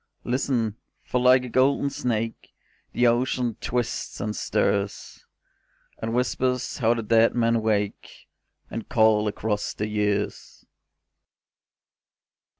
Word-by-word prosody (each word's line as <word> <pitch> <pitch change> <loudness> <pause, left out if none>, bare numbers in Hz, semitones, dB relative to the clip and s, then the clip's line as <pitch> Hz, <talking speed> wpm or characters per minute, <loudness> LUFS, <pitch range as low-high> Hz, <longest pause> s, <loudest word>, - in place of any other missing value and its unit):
Listen, 120 -4 -1 0.3
for 125 - -1
like 125 0 +5
a - - -5
golden 135 +3 +2
snake 115 -3 -3 0.4
The 125 - +1
Ocean 120 -1 +1
twists 120 -1 -3
and 105 +1 -3
stirs, 100 0 -2 0.7
And 115 +1 -3
whispers 125 +1 -1
how 115 -1 +3
the 115 - -3
dead 115 +2 +3
men 115 -1 +2
wake 105 -2 -2 0.4
And 115 - -6
call 110 -3 +4
across 105 0 -2
the 105 - -2
years. 105 -1 -2
115 Hz, 110 wpm, -25 LUFS, 105-125 Hz, 0.7 s, like